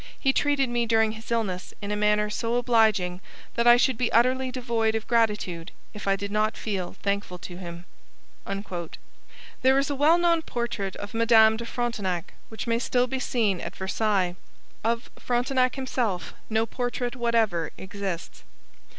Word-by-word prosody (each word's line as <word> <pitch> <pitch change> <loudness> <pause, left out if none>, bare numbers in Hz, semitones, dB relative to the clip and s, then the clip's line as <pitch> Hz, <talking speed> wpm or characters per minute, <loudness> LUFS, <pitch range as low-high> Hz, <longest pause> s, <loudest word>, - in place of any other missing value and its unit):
He 270 -2 +2
treated 285 -2 +2
me 240 -1 0
during 220 -1 +3
his 220 +1 -10
illness 205 -6 -2
in 205 0 -5
a - - 0
manner 210 0 +2
so 230 +2 -1
obliging 220 -7 +2 0.3
that 235 0 +1
I 240 0 +9
should 255 -1 +2
be 245 - +1
utterly 255 +3 +3
devoid 235 -3 0
of 225 - -3
gratitude 210 -8 0 0.2
if 210 -1 -8
I 195 - +4
did 200 +1 -5
not 215 +1 +1
feel 195 -5 -3
thankful 200 -2 -1
to 175 0 -9
him.' 175 -1 -8 1.8
There 265 +1 +5
is 275 +1 +1
a - - -1
well 300 +5 +5
known 340 -1 +3
portrait 235 -8 -3
of 205 +1 -7
Madame 225 -1 +6
de 235 +1 -6
Frontenac, 205 -9 -2 0.2
which 220 - -6
may 230 -1 +1
still 245 0 +2
be 265 +1 -3
seen 215 -8 0
at - - -6
Versailles. 190 -2 0 0.5
Of 230 +1 -1
Frontenac 255 +1 +1
himself 245 -8 -2 0.2
no 220 0 +2
portrait 245 +1 -3
whatever 225 - +1
exists. 190 -3 -5
225 Hz, 160 wpm, -26 LUFS, 200-245 Hz, 1.8 s, I